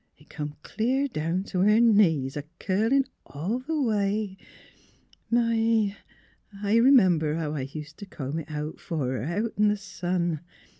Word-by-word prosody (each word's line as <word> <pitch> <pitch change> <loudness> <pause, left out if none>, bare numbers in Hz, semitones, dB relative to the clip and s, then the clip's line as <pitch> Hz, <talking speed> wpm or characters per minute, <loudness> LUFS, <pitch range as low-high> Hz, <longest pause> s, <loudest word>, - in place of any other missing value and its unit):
It 150 +2 -22
come 150 -1 -5
clear 260 +5 0
down 170 - -2
t' 190 -2 -3
her 210 +4 +5
knees, 170 - +4
a 145 - -2 0.2
curlin' 225 +8 +2 0.2
all 180 - -3
the 305 +4 -2
way.... 210 -4 0 0.9
My! 225 -3 +2 0.7
I 210 +3 +3
r - - +4
'member 180 - +5
how 160 -2 -2
I 135 -3 -4
used 155 +1 -8
t' 205 - -8
comb 145 -2 -4
it 160 - -9 0.3
fer 165 - -5
her, 130 -4 -1
out 205 - -2
in 210 0 +4
the 210 0 +2
sun. 175 -4 -2
195 Hz, 155 wpm, -26 LUFS, 155-225 Hz, 0.9 s, her